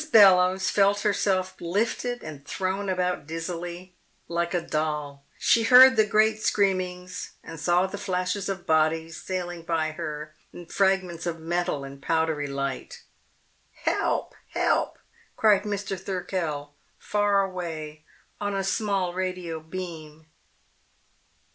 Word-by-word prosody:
Bellowes 190 Hz, -3 st, +6 dB
felt 200 Hz, 0 st, +3 dB
herself 190 Hz, -2 st, +1 dB
lifted 230 Hz, +7 st, -1 dB
and 150 Hz, -3 st, -8 dB
thrown 190 Hz, +5 st, -2 dB
about 180 Hz, -4 st, -1 dB
dizzily, 175 Hz, +2 st, -5 dB, 0.3 s
like 170 Hz, +1 st, -1 dB
a 175 Hz, -, +1 dB
doll. 150 Hz, -3 st, -3 dB
She 230 Hz, -, +4 dB
heard 255 Hz, +3 st, +9 dB
the 215 Hz, -1 st, +4 dB
great 215 Hz, +1 st, +3 dB
screamings 185 Hz, -3 st, -1 dB
and 165 Hz, -1 st, -9 dB
saw 175 Hz, +4 st, +3 dB
the 195 Hz, +1 st, -6 dB
flashes 185 Hz, +1 st, -2 dB
of 190 Hz, -2 st, -4 dB
bodies 160 Hz, +1 st, +1 dB
sailing 175 Hz, -2 st, -4 dB
by 165 Hz, -1 st, -1 dB
her 155 Hz, -1 st, -6 dB, 0.2 s
in 175 Hz, -, -10 dB
fragments 185 Hz, -2 st, 0 dB
of 165 Hz, -1 st, -3 dB
metal 170 Hz, -2 st, -1 dB
and 140 Hz, 0 st, -9 dB
powdery 160 Hz, -2 st, 0 dB
light. 140 Hz, -1 st, -4 dB, 0.8 s
"Help, -, -, 0 dB, 0.2 s
help!" -, -, +1 dB, 0.4 s
cried 210 Hz, -2 st, +4 dB
Mr. 200 Hz, -2 st, -3 dB
Thirkell, 170 Hz, -6 st, -3 dB, 0.2 s
far 205 Hz, -1 st, +2 dB
away, 160 Hz, -5 st, -5 dB, 0.4 s
on 205 Hz, -1 st, -2 dB
a 195 Hz, -, 0 dB
small 195 Hz, -3 st, 0 dB
radio 180 Hz, -3 st, -3 dB
beam. 160 Hz, -2 st, -8 dB
180 Hz, 125 wpm, -26 LUFS, 160-195 Hz, 0.8 s, heard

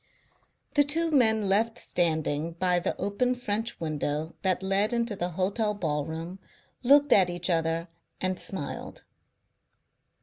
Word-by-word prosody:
The 290 Hz, -, +5 dB
two 325 Hz, +3 st, +1 dB
men 220 Hz, -7 st, +3 dB
left 220 Hz, +4 st, +1 dB
standing 160 Hz, -2 st, 0 dB
by 180 Hz, +1 st, +1 dB
the -, -, -3 dB
open 205 Hz, +6 st, 0 dB
French 225 Hz, -1 st, -3 dB
window 155 Hz, 0 st, -2 dB
that 190 Hz, -1 st, +1 dB
led 195 Hz, +4 st, +2 dB
into 235 Hz, -2 st, 0 dB
the 175 Hz, -2 st, -2 dB
hotel 200 Hz, +5 st, -1 dB
ballroom 160 Hz, +1 st, -3 dB, 0.4 s
looked 285 Hz, +2 st, +5 dB
at 185 Hz, -3 st, +5 dB
each 175 Hz, +1 st, -2 dB
other 165 Hz, 0 st, 0 dB, 0.3 s
and 185 Hz, 0 st, -1 dB
smiled. 170 Hz, -8 st, -5 dB
190 Hz, 130 wpm, -27 LUFS, 165-225 Hz, 0.4 s, The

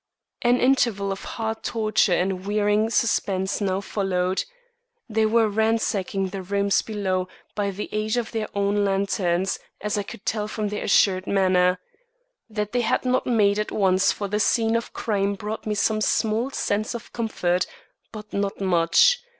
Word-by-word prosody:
An 245 Hz, +1 st, +3 dB
interval 235 Hz, -7 st, +2 dB
of 195 Hz, -, -5 dB
heart 220 Hz, -1 st, -3 dB
torture 215 Hz, -3 st, +1 dB
and 185 Hz, +1 st, -1 dB
wearing 210 Hz, +1 st, +2 dB
suspense 195 Hz, -4 st, 0 dB
now 195 Hz, -1 st, 0 dB
followed. 190 Hz, -2 st, -1 dB, 0.6 s
They 220 Hz, -1 st, +1 dB
were 225 Hz, 0 st, +3 dB
ransacking 205 Hz, -3 st, 0 dB
the 195 Hz, 0 st, -5 dB
rooms 200 Hz, +1 st, +1 dB
below 190 Hz, -4 st, -2 dB, 0.3 s
by 205 Hz, -1 st, -1 dB
the 200 Hz, +2 st, -5 dB
aid 215 Hz, +2 st, -1 dB
of 235 Hz, -2 st, -2 dB
their 220 Hz, -2 st, -2 dB
own 200 Hz, +1 st, +1 dB
lanterns, 195 Hz, -2 st, 0 dB, 0.2 s
as 210 Hz, 0 st, -1 dB
I -, -, 0 dB
could 200 Hz, +1 st, -10 dB
tell 210 Hz, -1 st, -1 dB
from 215 Hz, -1 st, -3 dB
their 210 Hz, -, -4 dB
assured 190 Hz, -1 st, +3 dB
manner. 185 Hz, -2 st, +3 dB, 0.7 s
That 210 Hz, -1 st, -3 dB
they 245 Hz, -, +1 dB
had 240 Hz, -, 0 dB
not 255 Hz, 0 st, +1 dB
made 210 Hz, -4 st, +3 dB
at 210 Hz, -, -2 dB
once 190 Hz, -1 st, +3 dB
for 200 Hz, -, -4 dB
the 210 Hz, +2 st, -1 dB
scene 225 Hz, +1 st, +2 dB
of 230 Hz, -, -2 dB
crime 200 Hz, -3 st, -1 dB
brought 210 Hz, +2 st, -6 dB
me 210 Hz, -, 0 dB
some 215 Hz, +1 st, +1 dB
small 225 Hz, +3 st, +1 dB
sense 215 Hz, -3 st, -1 dB
of 235 Hz, -, -9 dB
comfort, 180 Hz, -6 st, 0 dB, 0.4 s
but 215 Hz, -1 st, -10 dB
not 200 Hz, 0 st, -2 dB
much. 180 Hz, -, +4 dB
205 Hz, 165 wpm, -24 LUFS, 195-220 Hz, 0.7 s, much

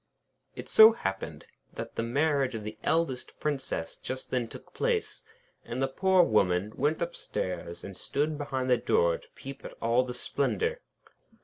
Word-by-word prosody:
It -, -, -7 dB
so 220 Hz, +1 st, +9 dB
happened 95 Hz, -, -4 dB, 0.3 s
that -, -, -6 dB
the -, -, 0 dB
marriage 135 Hz, +1 st, +1 dB
of 110 Hz, -, -5 dB
the 105 Hz, +1 st, -6 dB
eldest 160 Hz, -6 st, 0 dB
Princess 135 Hz, -, -2 dB
just 130 Hz, 0 st, -5 dB
then 125 Hz, -2 st, 0 dB
took -, -, -12 dB
place, 475 Hz, -2 st, -1 dB, 0.4 s
and 120 Hz, +2 st, -5 dB
the 135 Hz, -, +2 dB
poor 185 Hz, +6 st, +4 dB
Woman 100 Hz, -, +2 dB
went 150 Hz, +4 st, +1 dB
upstairs 90 Hz, -, -4 dB
and 100 Hz, -, -7 dB
stood 150 Hz, +10 st, -1 dB
behind 135 Hz, -3 st, -2 dB
the 125 Hz, -, +6 dB
door 85 Hz, -6 st, +2 dB
to -, -, -19 dB
peep 135 Hz, 0 st, -9 dB
at -, -, -9 dB
all 115 Hz, +2 st, +3 dB
the 125 Hz, -1 st, -5 dB
splendour. 450 Hz, -, -1 dB
130 Hz, 165 wpm, -29 LUFS, 115-155 Hz, 0.4 s, so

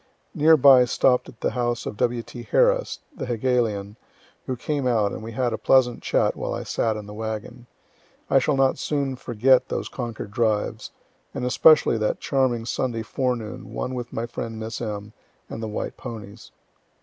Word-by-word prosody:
Near 160 Hz, +2 st, +5 dB
by 130 Hz, -2 st, +7 dB
stopp'd 125 Hz, +1 st, +2 dB
at 115 Hz, -, -16 dB
the -, -, 0 dB
house 120 Hz, -2 st, -1 dB
of -, -, -5 dB
W.T. 120 Hz, +2 st, -3 dB
Harris, -, -, +2 dB
the 130 Hz, -, -5 dB
Hegelian, 115 Hz, -4 st, -1 dB, 0.5 s
who 130 Hz, -, -1 dB
came 140 Hz, +1 st, -2 dB
out, 110 Hz, -5 st, +2 dB
and -, -, -6 dB
we 115 Hz, +1 st, -7 dB
had 120 Hz, 0 st, 0 dB
a -, -, -3 dB
pleasant 125 Hz, -3 st, +3 dB
chat -, -, +1 dB
while -, -, -3 dB
I -, -, -4 dB
sat 110 Hz, -2 st, -1 dB
in 105 Hz, -, -7 dB
the 105 Hz, -, -9 dB
wagon. 110 Hz, +3 st, -6 dB, 0.6 s
I 135 Hz, -, +4 dB
shall 145 Hz, +2 st, +1 dB
not 135 Hz, -1 st, +2 dB
soon 140 Hz, -3 st, -1 dB
forget 125 Hz, +2 st, +2 dB
those -, -, -3 dB
Concord 115 Hz, -5 st, -6 dB
drives, 110 Hz, -1 st, -1 dB, 0.5 s
and -, -, -2 dB
especially 150 Hz, -1 st, +5 dB
that 110 Hz, -, 0 dB
charming 130 Hz, -4 st, 0 dB
Sunday 115 Hz, -1 st, -2 dB
forenoon 120 Hz, -2 st, -3 dB
one 130 Hz, -, -3 dB
with 120 Hz, -1 st, -5 dB
my 115 Hz, -, -3 dB
friend 115 Hz, -1 st, -6 dB
Miss 110 Hz, +1 st, -5 dB
M., 105 Hz, -2 st, -5 dB, 0.4 s
and 115 Hz, -, -5 dB
the 110 Hz, -, -3 dB
white 105 Hz, -, -4 dB
ponies. 110 Hz, -1 st, -9 dB
120 Hz, 175 wpm, -24 LUFS, 110-130 Hz, 0.6 s, by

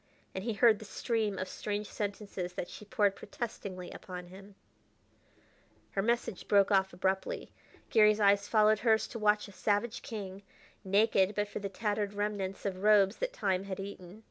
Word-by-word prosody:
And 190 Hz, -, -4 dB
he 230 Hz, 0 st, -1 dB
heard 215 Hz, +1 st, +5 dB
the 215 Hz, -, -9 dB
stream 215 Hz, -2 st, -1 dB
of 185 Hz, -, -3 dB
strange 205 Hz, +2 st, -3 dB
sentences 200 Hz, -4 st, -4 dB
that 175 Hz, -, -5 dB
she 210 Hz, -, -10 dB
poured 205 Hz, -1 st, +2 dB
protestingly 195 Hz, -6 st, -6 dB
upon 180 Hz, -1 st, -8 dB
him. 195 Hz, +2 st, -13 dB, 1.4 s
Her 195 Hz, -, 0 dB
message 235 Hz, -3 st, -1 dB
broke 200 Hz, -1 st, +4 dB
off 190 Hz, -1 st, +3 dB
abruptly. 190 Hz, +1 st, -2 dB, 0.4 s
Garry's 215 Hz, -1 st, +5 dB
eyes 200 Hz, 0 st, +4 dB
followed 215 Hz, -1 st, +4 dB
hers 220 Hz, -1 st, +3 dB
to 230 Hz, -, -6 dB
watch 210 Hz, 0 st, +2 dB
a -, -, -12 dB
savage 205 Hz, +4 st, -1 dB
king, 200 Hz, -3 st, -6 dB, 0.4 s
naked 200 Hz, 0 st, +3 dB
but 205 Hz, 0 st, 0 dB
for -, -, -5 dB
the 200 Hz, -1 st, -4 dB
tattered 205 Hz, 0 st, -2 dB
remnants 205 Hz, -2 st, -3 dB
of 195 Hz, -2 st, -1 dB
robes 205 Hz, -1 st, +5 dB
that -, -, -2 dB
time 195 Hz, -, -1 dB
had 195 Hz, -1 st, -5 dB
eaten. 195 Hz, 0 st, -8 dB
205 Hz, 170 wpm, -31 LUFS, 195-215 Hz, 1.4 s, heard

